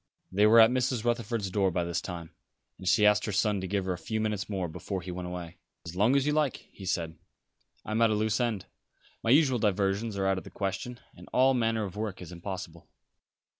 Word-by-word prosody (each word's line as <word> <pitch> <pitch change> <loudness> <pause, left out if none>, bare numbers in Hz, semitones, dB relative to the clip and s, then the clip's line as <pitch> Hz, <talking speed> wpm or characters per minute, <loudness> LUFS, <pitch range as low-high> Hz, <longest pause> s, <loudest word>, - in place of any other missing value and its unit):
They 105 +3 +4
were 115 +2 +7
at 110 +1 +8
Mrs. 125 -2 0
Rutherford's 115 -4 -1
door 95 -1 +2
by 90 -1 -1
this 85 0 -2
time, 85 -2 -7 0.5
and 95 - -7
she 105 +2 +5
asked 105 0 +4
her 105 - -2
son 105 0 +1
to 95 - -4
give 100 0 -1
her 95 - 0
a 90 - -7
few 110 -1 -3
minutes 105 -2 -2
more 95 -4 -2
before 90 +3 -5
he 90 - -6
went 90 0 -5
away. 90 -2 -7 0.3
"As 85 +1 -7
long 105 +8 +3
as 140 -1 +3
you 150 - +2
like," 150 -4 0
he 95 - -10
said. 80 -3 -2 0.7
"I - - -5
am 110 +2 +1
at 115 - +5
a 110 - +1
loose 105 -1 +1
end. 110 -6 -1 0.6
My 115 - -2
usual 135 -2 +5
diversions 100 +1 0
are 95 - 0
out 95 -1 +2
of - - -12
the - - -10
question; 100 +5 -4 0.2
and - - -13
all 130 +1 +4
manner 115 -3 +1
of 95 -2 -6
work 105 -3 -3
is 90 -2 -9
impossible." 90 -2 -7
100 Hz, 235 wpm, -29 LUFS, 95-115 Hz, 0.7 s, at